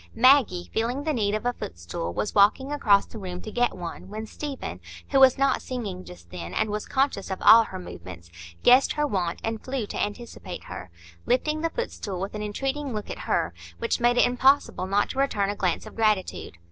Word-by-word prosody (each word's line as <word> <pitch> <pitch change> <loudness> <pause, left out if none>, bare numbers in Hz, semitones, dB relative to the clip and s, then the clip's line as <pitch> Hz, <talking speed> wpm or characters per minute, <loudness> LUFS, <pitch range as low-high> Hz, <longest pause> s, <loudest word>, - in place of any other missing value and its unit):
Maggie, 230 -7 +4
feeling 240 +5 -1
the 310 0 0
need 210 -5 0
of 215 - -4
a 245 - +1
footstool, 85 - -6
was 200 - -3
walking 215 +7 +4
across 210 -9 +3
the 225 - -10
room 180 -2 -6
to 215 - -7
get 245 +1 0
one, 175 +1 -7
when 215 +2 -5
Stephen, 280 +5 -6 0.3
who 275 - +4
was 265 -2 +7
not 275 -1 +2
singing 205 -8 -5
just 85 -1 -14
then, 85 -1 -7
and 215 - 0
was 210 0 -3
conscious 265 -7 0
of 190 - -3
all 230 0 +8
her 190 - -7
movements, 85 - -10 0.3
guessed 255 +2 +6
her 295 - 0
want, 180 -10 -2
and 225 -1 -3
flew 260 -3 -3
to - - -4
anticipate 220 +3 -6
her, 90 - -8 0.4
lifting 305 +5 +1
the 330 - 0
footstool 215 - -4
with 195 +2 -4
an 210 - -5
entreating 270 +6 -3
look 210 - -5
at - - -7
her, 85 +2 +1 0.2
which - - -1
made 240 0 +3
it - - +6
impossible 250 -5 +2
not 200 +2 +1
to 265 - -5
return 205 -8 +1
a - - -5
glance 180 -3 -1
of - - -11
gratitude. 215 - 0
215 Hz, 210 wpm, -26 LUFS, 190-260 Hz, 0.4 s, all